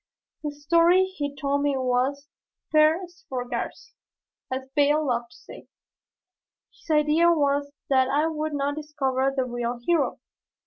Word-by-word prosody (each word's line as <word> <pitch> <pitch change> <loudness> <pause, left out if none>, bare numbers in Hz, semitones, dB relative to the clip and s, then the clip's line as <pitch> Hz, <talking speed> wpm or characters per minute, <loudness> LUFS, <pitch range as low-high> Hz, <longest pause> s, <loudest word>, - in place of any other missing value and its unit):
The 300 - -3
story 335 +5 +3
he 290 -7 -5
told 280 0 -1
me 285 -1 +1
was 260 +3 0 0.4
"per 310 +4 +4
sfogarsi," 270 - -6 0.6
as 260 0 -4
Bayle 295 +1 +3
loved 240 -3 -1
to - - -18
say; - - -13 1.1
his - - -22
idea 305 +2 +4
was 285 -2 +1 0.2
that 260 -1 +4
I 295 +3 +2
would 310 -1 -2
not 285 0 -1
discover 270 -3 -1
the 260 - +1
real 240 0 -3
hero. 335 -4 +1
285 Hz, 135 wpm, -25 LUFS, 265-310 Hz, 1.1 s, per